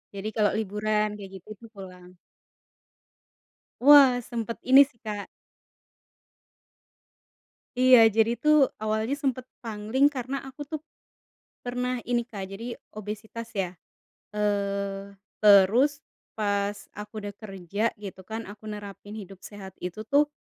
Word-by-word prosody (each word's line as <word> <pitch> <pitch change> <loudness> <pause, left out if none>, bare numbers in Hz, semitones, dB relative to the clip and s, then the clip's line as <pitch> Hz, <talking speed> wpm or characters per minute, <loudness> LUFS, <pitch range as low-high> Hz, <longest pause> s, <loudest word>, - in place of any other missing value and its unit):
Jadi 205 +2 -4
kalau 210 -2 +3
liburan 210 +1 0
kayak 195 -2 -10
gitu 190 - -21
tuh 230 - -13
pulang. 180 -2 -11 1.7
Wah, 270 -2 +8
sempet 230 -1 -5
ini 275 +2 +9
sih 245 -5 -25
Kak. 210 -2 -5 2.5
Iya, 255 -2 +8
jadi 225 +2 +2
tuh 300 0 +4 0.2
awalnya 220 +4 0
sempet 260 -3 -2 0.2
pangling 225 +6 +1
karena 270 0 -4
aku 270 +2 -9
tuh 310 0 -5 0.8
pernah 250 0 -2
ini 240 -1 -1
Kak, 205 -5 -7
jadi 230 +5 -6 0.2
obesitas 220 +2 -7
ya. 190 -3 -1 0.7
Eee, 200 -1 -2 0.2
terus 215 +8 +5 0.3
pas 205 -1 0 0.2
aku 210 +1 -8
udah 205 - -5
kerja 200 +1 -3
gitu 195 -2 -9
kan, 225 +1 -4
aku 210 +1 -10
nerapin 205 0 -8
hidup 195 -3 -10
sehat 195 -2 -10
itu 180 +4 -5
tuh, 285 +6 +3
215 Hz, 120 wpm, -27 LUFS, 200-245 Hz, 2.5 s, ini